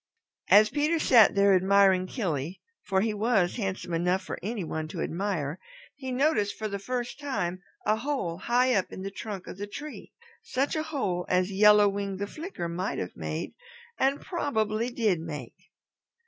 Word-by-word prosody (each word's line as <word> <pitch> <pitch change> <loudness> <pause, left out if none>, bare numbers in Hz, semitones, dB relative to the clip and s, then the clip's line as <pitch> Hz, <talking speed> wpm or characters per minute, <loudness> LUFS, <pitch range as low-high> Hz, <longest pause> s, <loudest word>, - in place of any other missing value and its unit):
As 210 +1 +7
Peter 300 +3 +1
sat 240 -10 +6
there 200 0 +5
admiring 190 0 +4
Killy, 175 - -3 0.2
for 190 -1 0
he 220 +1 0
was 210 -3 +1
handsome 190 -5 -3
enough 180 +3 +1
for - - -6
any 210 +1 -3
one 160 -1 -4
to 165 +1 -5
admire, 170 -4 -2 0.3
he 265 -2 -6
noticed 250 -6 +1
for 215 - -3
the 200 -1 -4
first 245 +5 -4
time 185 -11 -2 0.2
a 215 - +3
hole 225 - -2
high 250 +4 +2
up 195 -4 0
in 190 - -7
the 195 - -4
trunk 200 -2 -6
of 185 - -9
the 205 - -4
tree, 295 +8 -8 0.3
such 275 +4 -1
a 310 - 0
hole 185 - -2
as 185 +1 +2
Yellow 210 +1 +6
Wing 200 -1 -2
the 200 - -2
Flicker 305 - -6
might 180 +3 -3
have 90 - -4
made 80 -1 -4 0.5
and 275 +2 +2
probably 230 - -1
did 220 -8 +1
make. 150 -7 -8
200 Hz, 175 wpm, -28 LUFS, 180-245 Hz, 0.5 s, As